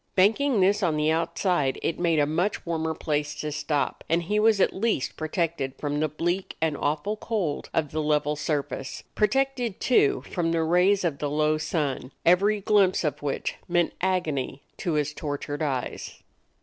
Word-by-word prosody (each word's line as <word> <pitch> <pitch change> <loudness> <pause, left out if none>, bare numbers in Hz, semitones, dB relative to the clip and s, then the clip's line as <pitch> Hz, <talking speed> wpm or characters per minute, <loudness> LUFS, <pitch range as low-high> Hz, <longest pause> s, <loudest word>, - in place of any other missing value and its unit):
Banking 220 +5 +3
this 200 +3 +3
on 165 -5 +1
the 150 +1 +2
outside 165 -3 0
it 165 - -1
made 170 -2 +2
a 145 - +4
much 170 +7 -1
warmer 160 -1 -1
place 150 -1 -2
to 150 - -4
stop; 150 0 -1
and 170 +2 +2
he 210 +5 0
was 215 -1 +4
at - - +3
least 205 - -1
protected 155 -4 -2
from 145 0 -2
the 155 - +2
bleak 175 +5 -2
and 160 -2 +1
awful 155 +9 -1
cold 205 -9 -2
of 150 -3 -1
the 155 - -1
level 150 0 +1
surface; 145 -2 -3
protected, 245 -1 0
too, 140 - +3
from 165 -2 0
the 165 -1 +1
rays 180 +4 +3
of 155 -5 -1
the 145 - -1
low 155 +1 +1
sun, 145 -5 -2
every 200 +5 +4
glimpse 195 -3 +3
of 150 - -2
which 145 -2 -2
meant 175 -1 +1
agony 160 -8 -1
to 175 -5 -2
his 150 0 0
tortured 145 0 -4
eyes. 135 -5 -3
160 Hz, 175 wpm, -26 LUFS, 150-190 Hz, -, a